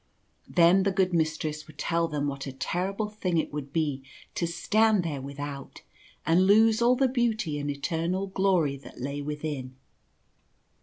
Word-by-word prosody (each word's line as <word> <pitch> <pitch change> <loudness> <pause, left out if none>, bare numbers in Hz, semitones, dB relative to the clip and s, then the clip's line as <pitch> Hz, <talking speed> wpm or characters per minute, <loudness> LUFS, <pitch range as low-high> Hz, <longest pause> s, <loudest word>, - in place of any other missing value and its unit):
Then 175 +2 +5
the 200 +1 +1
good 185 -1 +1
Mistress 155 -2 -1
would 155 - -15
tell 170 0 0
them 150 -2 -2
what 140 0 -4
a - - -4
ter 175 +8 -2
rible 210 +1 -4
thing 185 -5 -1
it 160 - -1
would 145 -2 -5
be 145 -4 -1 0.3
to 170 - -1
stand 210 +4 +2
there 150 -5 -3
without, 140 0 -7 0.4
and 170 +4 +4
lose 220 +2 +5
all 245 +2 +5
the 265 +1 +3
beauty 220 - 0
and 145 0 -3
eternal 165 +6 -1
glory 190 -7 +1
that 135 - -13
lay 140 +3 -3
within. 145 -3 -5
165 Hz, 165 wpm, -27 LUFS, 145-195 Hz, 0.4 s, Then